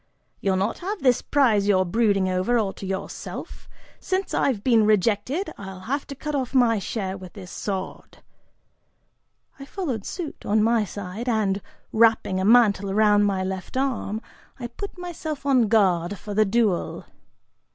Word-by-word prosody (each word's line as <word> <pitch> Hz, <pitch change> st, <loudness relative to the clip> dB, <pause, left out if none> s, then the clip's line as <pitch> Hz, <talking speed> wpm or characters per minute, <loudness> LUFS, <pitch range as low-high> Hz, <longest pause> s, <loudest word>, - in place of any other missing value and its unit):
"You'll 195 Hz, -1 st, +1 dB
not 195 Hz, +4 st, -1 dB
have 395 Hz, +1 st, -4 dB
this 250 Hz, -3 st, +4 dB
prize 225 Hz, -8 st, +2 dB
you're 185 Hz, -2 st, +3 dB
brooding 200 Hz, 0 st, +2 dB
over, 185 Hz, +6 st, +1 dB
all 200 Hz, -4 st, 0 dB
to 195 Hz, -, -8 dB
yourself! 190 Hz, +1 st, -6 dB, 0.3 s
Since 380 Hz, +1 st, -2 dB
I've 235 Hz, -7 st, +1 dB
been 230 Hz, -4 st, +4 dB
rejected, 215 Hz, -, +1 dB
I'll 190 Hz, -2 st, -8 dB
have 275 Hz, +8 st, -3 dB
to 280 Hz, -, -7 dB
cut 300 Hz, +2 st, -5 dB
off 265 Hz, -2 st, -2 dB
my 235 Hz, -4 st, +4 dB
share 195 Hz, -1 st, -3 dB
with 185 Hz, -2 st, -10 dB
this 185 Hz, -4 st, -10 dB
sword." 190 Hz, -2 st, -5 dB, 1.4 s
I 275 Hz, -, -8 dB
followed 280 Hz, -, -4 dB
suit, 335 Hz, -, -6 dB
on 210 Hz, +1 st, +2 dB
my 225 Hz, -1 st, +3 dB
side, 205 Hz, +5 st, -5 dB
and, 205 Hz, -4 st, +1 dB, 0.3 s
wrapping 220 Hz, -4 st, +3 dB
a 190 Hz, -, 0 dB
mantle 210 Hz, -4 st, +4 dB
around 205 Hz, 0 st, +4 dB
my 195 Hz, -2 st, 0 dB
left 190 Hz, +5 st, -5 dB
arm, 245 Hz, -5 st, -1 dB, 0.4 s
I 245 Hz, -, -5 dB
put 375 Hz, +13 st, -7 dB
myself 330 Hz, -5 st, -6 dB
on 255 Hz, -5 st, +4 dB
guard 195 Hz, -3 st, +2 dB
for 205 Hz, +1 st, -7 dB
the 215 Hz, +1 st, +4 dB
duel. 210 Hz, -3 st, 0 dB
215 Hz, 160 wpm, -24 LUFS, 195-255 Hz, 1.4 s, this